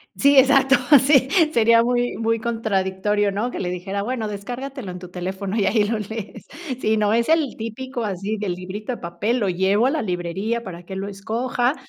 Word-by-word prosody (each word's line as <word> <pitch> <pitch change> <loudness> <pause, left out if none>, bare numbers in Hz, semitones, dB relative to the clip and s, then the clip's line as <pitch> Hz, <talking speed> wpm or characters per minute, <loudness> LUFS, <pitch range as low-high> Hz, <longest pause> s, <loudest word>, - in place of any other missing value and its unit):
Sí, 280 0 +4
exacto, 270 0 +5 0.2
sí, 265 -1 +4 0.3
sería 230 0 +5
muy 245 0 0
muy 230 0 +1
contradictorio, 205 -3 0
¿no? 215 +5 -2
Que - - -6
le 180 - -2
dijera: 195 +3 -4
"Bueno, 225 -1 -3
descárgatelo 245 +3 -6
en 180 - -7
tu 180 0 -10
teléfono 190 +3 -4
y 205 - +2
ahí 210 0 +3
lo 220 +2 -1
lees". 215 0 -7 0.4
Sí, 220 0 +2
no, 210 0 +2
es 235 +5 +1
el 320 -5 +2
típico 240 +2 -5
así, 200 +1 -3
del 205 -4 -2
librito 190 +6 -6
de 240 - -5
papel. 190 +8 -2
Lo 205 - 0
llevo 190 +5 +2
a - - +3
la 310 -2 -1
librería 190 +5 -2
para 180 -5 -8
que 185 - -11
él 190 - -4
lo 195 +1 -4
escoja, 240 +6 -1
215 Hz, 200 wpm, -22 LUFS, 195-240 Hz, 0.4 s, exacto